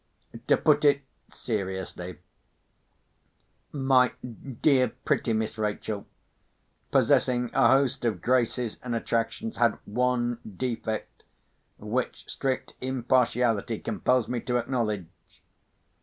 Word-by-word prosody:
To - - +5
put 150 -1 +3
it 140 -1 +4 0.3
seriously, 95 -4 -4 1.5
my 135 -3 +3 0.5
dear 130 -6 +4
pretty 115 - +1
Miss 110 0 -1
Rachel, 105 -1 -3 0.8
possessing 125 -1 +3
a - - +5
host 135 -2 +3
of 110 -6 0
graces 120 0 0
and 120 -2 -3
attractions, 115 - -2
had 120 -1 +3
one 120 +1 0 0.2
defect, 115 -3 -3 0.6
which 115 +4 -3
strict 130 -2 -2
impartiality 125 -3 +1
compels 125 -3 +1
me 125 - -1
to 125 -1 0
acknowledge. 115 -6 -1
120 Hz, 95 wpm, -27 LUFS, 110-130 Hz, 1.5 s, To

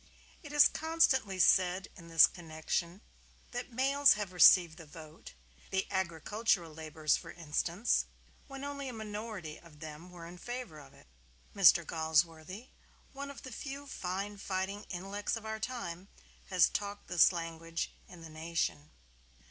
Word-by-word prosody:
It 290 - -10
is 295 -1 +7
constantly 295 - +1
said 185 0 +4
in 170 - -13
this 165 -1 +8
connection 170 +2 -4 0.5
that 245 +1 -5
males 275 +3 +4
have 210 -3 -5
received 175 -1 +6
the 160 - -11
vote 155 - -12 0.3
(the 190 0 0
agricultural 190 0 -1
laborers 155 -1 0
for - - -10
instance) 170 +6 0 0.4
when 275 -1 -8
only 280 -1 -5
a - - -7
minority 210 -7 -6
of 165 -3 -17
them 155 +2 -9
were 175 -2 -11
in 175 +1 -11
favor 240 -8 -6
of 140 -2 -15
it. - - -19 0.5
Mr. 175 -3 +6
Galsworthy, 160 - -1 0.4
one 280 +1 -6
of 280 - -10
the 260 - -8
few 275 +3 -7
fine 200 -4 -4
fighting 195 +2 -3
intellects 195 +3 -3
of 225 -1 -8
our 220 0 -4
time, 195 -7 -5 0.4
has 185 -3 +4
talked 205 0 -4
this 175 0 +5
language 165 -1 -4 0.2
in 175 -2 -13
the 165 - -9
"Nation." 155 - -3
185 Hz, 150 wpm, -32 LUFS, 165-220 Hz, 0.5 s, this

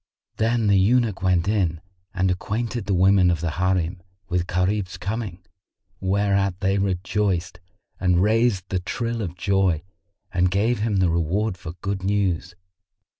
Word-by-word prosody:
Then 115 +1 +1
the 100 -2 +4
eunuch 110 0 +2
went 90 -1 +2
in 95 -6 +1 0.3
and 95 -1 +1
acquainted 110 +3 -3
the 100 - +1
women 95 0 +5
of 85 -2 +1
the 85 -1 -2
Harim 90 +1 0 0.3
with 90 -1 0
Gharib's 90 +1 -1
coming, 100 -3 -5 0.5
whereat 100 -1 +1
they 95 0 +1
rejoiced 95 -2 -1 0.4
and 90 -2 +2
raised 110 -3 +2
the 95 - 0
trill 115 +5 -3
of 90 -4 -4
joy 95 -4 +1 0.5
and 90 0 +3
gave 105 +6 +1
him 105 -1 0
the 90 -3 +3
reward 90 +5 0
for 80 -2 -8
good 100 -1 -2
news. 95 -3 0
95 Hz, 145 wpm, -23 LUFS, 90-105 Hz, 0.5 s, women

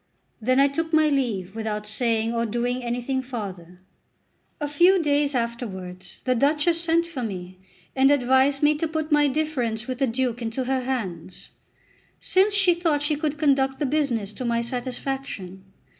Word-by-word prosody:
Then 255 +4 +2
I 280 - +6
took 320 +3 -3
my 310 -1 +5
leave 220 -9 -1
without 215 -1 -3
saying 225 +1 0
or 230 0 0
doing 245 +3 -2
anything 245 +2 -2
farther. 190 -8 -7 0.8
A 295 - -2
few 350 +6 +4
days 290 -3 +1
afterwards 190 -7 -5
the 255 - +2
Duchess 300 +6 +2
sent 335 0 +2
for 335 -6 -6
me, 185 -4 -6 0.4
and 265 0 +5
advised 270 +1 +3
me 295 +1 +5
to 325 - 0
put 315 0 -3
my 295 -1 +5
difference 260 -6 -1
with 255 -1 -5
the 270 - +2
Duke 245 0 -1
into 230 +3 -2
her 260 +1 0
hands, 185 -9 -5 0.7
since 395 +2 +3
she 395 -3 +5
thought 325 -4 0
she 300 0 +1
could 300 0 -2
conduct 270 -2 +2
the 295 - -1
business 255 -8 -1
to 255 - -6
my 235 -1 0
satisfaction. 245 -6 -5
260 Hz, 165 wpm, -24 LUFS, 225-295 Hz, 0.8 s, I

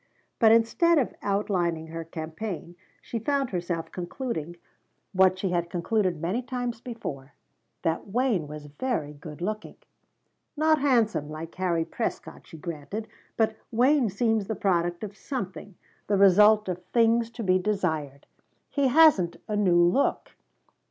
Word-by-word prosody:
But 225 -2 +6
instead 230 +10 +4
of 270 - +1
outlining 185 -5 0
her 165 0 -5
campaign 165 +3 -6 0.3
she 230 - -4
found 275 +3 0
herself 175 -2 -3
concluding, 175 - -4 0.6
what 185 0 +4
she 190 0 -1
had 170 -1 -1
concluded 180 0 0
many 180 +9 -1
times 245 -2 -4
before, 150 - -7 0.5
that 165 +4 -1
Wayne 220 - 0
was 150 0 -8
very 150 - -3
good 150 +2 -10
looking. 215 +2 -4 0.8
"Not 310 0 +3
handsome, 225 - +2
like 160 +2 -7
Harry 175 -3 0
Prescott," - - -5
she 160 - -11
granted, 170 +7 -6 0.3
"but 220 -1 +1
Wayne 250 +1 +3
seems 220 0 0
the 220 - -2
product 175 -2 0
of 205 -1 -6
something 200 -5 -6 0.3
the 200 - +2
result 210 +2 +6
of 180 -1 -4
things 230 0 +2
to 230 0 -7
be 185 -1 +3
desired. 160 -8 -2 0.5
He 280 -1 +2
hasn't 260 - +5
a 210 - -2
new 180 -4 +4
look." 175 +11 +1
195 Hz, 140 wpm, -27 LUFS, 170-230 Hz, 0.8 s, But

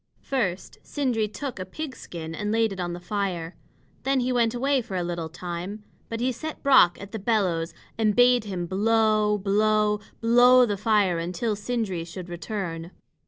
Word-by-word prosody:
First 205 -10 -2
Sindri 245 -7 -1
took 255 +1 -6
a - - -2
pig's 265 +8 -7
skin 165 -2 -7
and 210 +4 -3
laid 225 -2 +2
it 190 - -9
on 175 -1 -2
the 175 - -6
fire. 180 -3 -3 0.5
Then 270 -1 +1
he 250 +1 0
went 235 -1 +2
away 270 +2 +1
for 200 -4 -7
a 180 - -1
little 170 -2 -3
time; 180 +5 -6 0.3
but 230 - -4
he 250 +2 +1
set 310 +6 -7
Brock 260 -11 +6
at 200 0 -9
the 220 - -4
bellows 190 -6 0 0.3
and 215 -2 +2
bade 245 -2 +5
him 185 -4 -3
blow 215 +2 +2
blow 210 +1 +2 0.2
blow 245 +2 +6
the 205 -3 -1
fire 200 -4 +2
until 180 +6 -2
Sindri 210 -5 -2
should 175 +1 -8
return. 175 -2 -5
210 Hz, 175 wpm, -25 LUFS, 180-235 Hz, 0.5 s, Brock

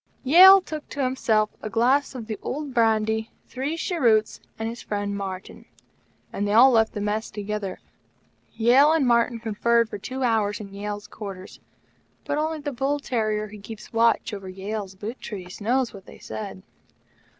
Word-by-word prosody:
Yale 375 +8 +9
took 310 -4 -7
to 285 - -3
himself 225 -5 +1
a 215 - -5
glass 260 +7 +2
of 235 -3 -6
the 215 -1 -5
old 290 0 -4
brandy, 220 -1 +1 0.2
three 275 +5 -4
cheroots, 235 - +1 0.2
and 225 - -3
his 235 +1 -6
friend, 205 -1 -3
Martyn; 190 -1 -7 0.7
and 205 - -1
they 205 - 0
all 250 +4 +8
left 225 -2 +3
the 210 - -4
Mess 210 +2 -2
together. 205 -2 -4 0.8
Yale 260 +7 +5
and 320 -4 +2
Martyn 235 -1 +2
conferred 230 +1 +1
for 205 - -7
two 260 +5 -5
hours 220 -4 +1
in 200 -2 -9
Yale's 205 +1 -5
quarters; 195 -3 -9 0.7
but 290 - -1
only 315 +1 -1
the 290 0 -4
bull 275 +3 -1
terrier 215 -5 -1
who 210 0 -11
keeps 215 +2 -10
watch 230 0 +2
over 195 -2 -6
Yale's 195 +1 -5
boot 215 +6 -7
trees 185 -3 -8
knows 245 +3 0
what 195 -2 -12
they - - -12
said. 95 -4 -7
220 Hz, 170 wpm, -24 LUFS, 205-255 Hz, 0.8 s, Yale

